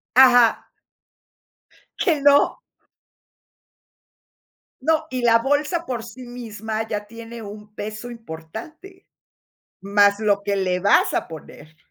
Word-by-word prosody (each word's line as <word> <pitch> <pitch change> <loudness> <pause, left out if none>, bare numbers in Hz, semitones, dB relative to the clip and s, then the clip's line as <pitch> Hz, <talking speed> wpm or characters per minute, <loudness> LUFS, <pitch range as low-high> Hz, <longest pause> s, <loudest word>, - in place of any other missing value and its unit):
Ajá. 245 -3 +6 1.3
Que 320 -5 +1
no. 285 - +4 2.2
No, 315 +3 +1
y 255 -1 -2
la 230 -1 +5
bolsa 295 +6 0
por 240 -3 -4
sí 235 +3 -11
misma 220 -2 -5
ya 210 -2 -4
tiene 230 +1 -10
un 210 0 -10
peso 215 +3 -6
importante, 230 - -10 0.7
más 200 +1 +3
lo 200 -2 +1
que 200 0 -1
le 185 -1 0
vas 200 +1 +4
a - - -1
poner. 155 0 -12
225 Hz, 110 wpm, -22 LUFS, 205-255 Hz, 2.2 s, Ajá